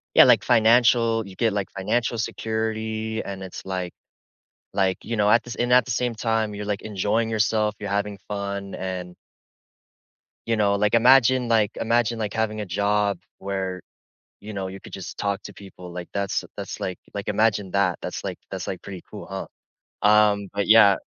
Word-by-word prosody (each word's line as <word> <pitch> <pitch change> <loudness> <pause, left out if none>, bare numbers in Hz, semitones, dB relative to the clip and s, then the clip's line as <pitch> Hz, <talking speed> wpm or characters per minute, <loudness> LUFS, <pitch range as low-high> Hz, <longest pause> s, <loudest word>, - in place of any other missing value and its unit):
Yeah - - +10
like - - +5
financial 115 -1 +4
you 95 - -11
get, 115 -3 +1
like, 100 -2 -2
financial 115 +5 -1
security, 110 0 -2
and 95 -1 -6
it's 95 - -8
like 95 -2 -3 0.8
like, 95 -1 +1
you 115 - -2
know, 105 -1 +3
at 120 - +5
the 120 - -9
sa - - -3
and 120 - -1
at 125 -2 +6
the 125 - -4
same 120 0 0
time, 110 -2 0
you're 105 0 -5
enjoying 110 +2 0
yourself, 105 -1 +1
you're 105 -1 -5
having 100 0 -1
fun, 100 -1 -4
and 90 -1 -5 1.3
you 115 - +2
know, 100 -2 +2
like, 105 +2 +1
imagine 125 0 +5
like 110 -3 +3
imagine 115 0 +1
like, 105 -1 -2
having 110 -1 -1
a - - -4
job 100 +1 +1 0.2
where, 95 -2 -3 0.6
you 105 +1 -8
know, 95 -1 -3
you 95 +1 -8
could - - -13
just 95 - -7
talk 100 0 -1
to - - -9
people, 90 -3 -11
like 90 0 -6
that's 100 -1 -1
that's - - -6
like 95 -1 -3 0.2
like 100 -1 -5
imagine 105 -2 +1
that, 95 -3 +1
that's - - -5
like - - -4
that's - - -5
like - - -4
pretty 95 -3 -8
cool, - - -8
huh, - - -5 0.6
um, 105 -2 +4
but 100 0 -1
yeah 110 -3 +8
105 Hz, 185 wpm, -24 LUFS, 100-110 Hz, 1.3 s, Yeah